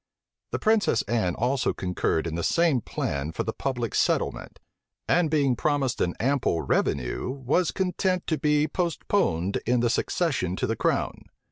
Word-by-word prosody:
The - - -2
princess 215 - +2
Anne 105 -6 0
also 125 +2 0
concurred 90 -3 -1
in 85 - -3
the 85 - -2
same 165 - +2
plan 70 -5 -3
for - - -2
the 110 - -3
public 125 -4 -3
settlement; - - 0 0.5
and 170 -2 +3
being 140 -4 +2
promised 140 -2 0
an 90 - 0
ample 130 -9 +1
revenue, 60 - 0
was 140 +6 0
content 185 -1 -1
to 160 -3 -1
be 150 +1 +2
postponed 155 - 0
in 120 +1 +2
the 120 -1 +2
succession 130 - 0
to - - -1
the - - -1
crown. - - -1
130 Hz, 155 wpm, -26 LUFS, 100-160 Hz, 0.5 s, and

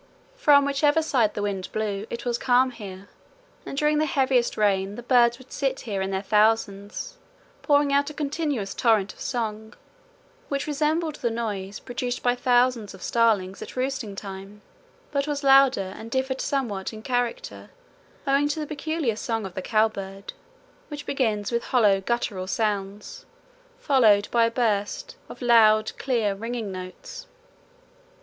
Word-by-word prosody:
From 290 - +5
whichever 290 +3 +2
side 245 -9 +1
the 205 - -2
wind 195 -2 -3
blew 210 -1 -3
it 235 +1 -6
was 240 -1 -1
calm 255 0 +3
here, 200 -4 -10 0.6
and 275 - -6
during 300 +1 +2
the 310 - +1
heaviest 260 -3 +1
rain 200 -1 +1
the 240 - -8
birds 240 -1 +4
would 260 0 -17
sit 270 -2 -2
here 200 -5 -3
in 190 - -2
their 190 0 -2
thousands, 210 - 0 0.4
pouring 285 -1 +3
out 285 +1 +2
a - - -8
continuous 290 -8 -2
torrent 220 -4 +2
of - - -22
song, 220 -3 -4 0.7
which 280 -1 -1
resembled 305 +1 0
the 235 - -1
noise 210 -4 -4
produced 245 0 -4
by 245 - +3
thousands 245 -4 +1
of 185 - -12
starlings 210 -5 +1
at - - -8
roosting 255 -5 -3
time, 195 +1 -9 0.5
but 280 0 -1
was 290 -1 -3
louder 270 -8 +5
and 225 - -9
differed 260 +1 -1
somewhat 225 -9 -2
in 220 -1 -10
character 245 -1 -3 0.6
owing 280 +1 +3
to 295 +2 -2
the 305 - -2
peculiar 300 -4 -2
song 225 -1 -3
of 190 - -7
the 185 - -4
cow 215 +3 +3
bird, 195 -2 -8 0.5
which 295 -1 -7
begins 220 -7 -1
with 235 0 -1
hollow 210 -6 +3
guttural 200 -4 -2
sounds, 205 -1 -3 0.5
followed 235 - +4
by 235 -1 +4
a - - +1
burst 230 - -1
of - - -9
loud 215 -2 +5
clear 230 -6 0
ringing 225 0 -4
notes. 485 - -9
235 Hz, 155 wpm, -25 LUFS, 205-275 Hz, 0.7 s, From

